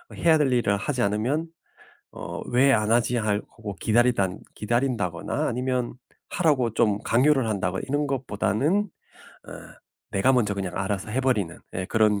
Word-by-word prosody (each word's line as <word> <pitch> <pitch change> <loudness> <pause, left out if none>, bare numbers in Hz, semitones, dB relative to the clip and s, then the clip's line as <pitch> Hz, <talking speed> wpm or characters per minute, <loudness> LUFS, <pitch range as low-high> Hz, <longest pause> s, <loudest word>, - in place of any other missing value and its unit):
해야 160 -2 +4
될 145 -3 +2
일을 100 -5 +2
하지 125 +4 -2
않으면 120 +11 0 0.6
'어 - - -7
왜 135 +3 +4
안 110 0 +1
하지?' 120 +1 +2
하고 105 -1 -3
기다리단 110 -4 +2 0.2
기다린다거나 110 -6 -1
아니면 125 0 -2 0.3
하라고 135 -10 +1
좀 105 -3 +2
강요를 130 +1 +3
한다거나 95 -3 -2
이런 145 +2 0
것보다는 135 - 0 0.6
어 - - -7 0.6
내가 100 +7 +3
먼저 110 -6 +1
그냥 95 -2 -4
알아서 100 +1 -2
해 130 - 0
버리는 105 -10 0 0.2
예 95 0 -3
그런 105 -2 +2
115 Hz, 315 characters per minute, -25 LUFS, 100-130 Hz, 0.6 s, 해야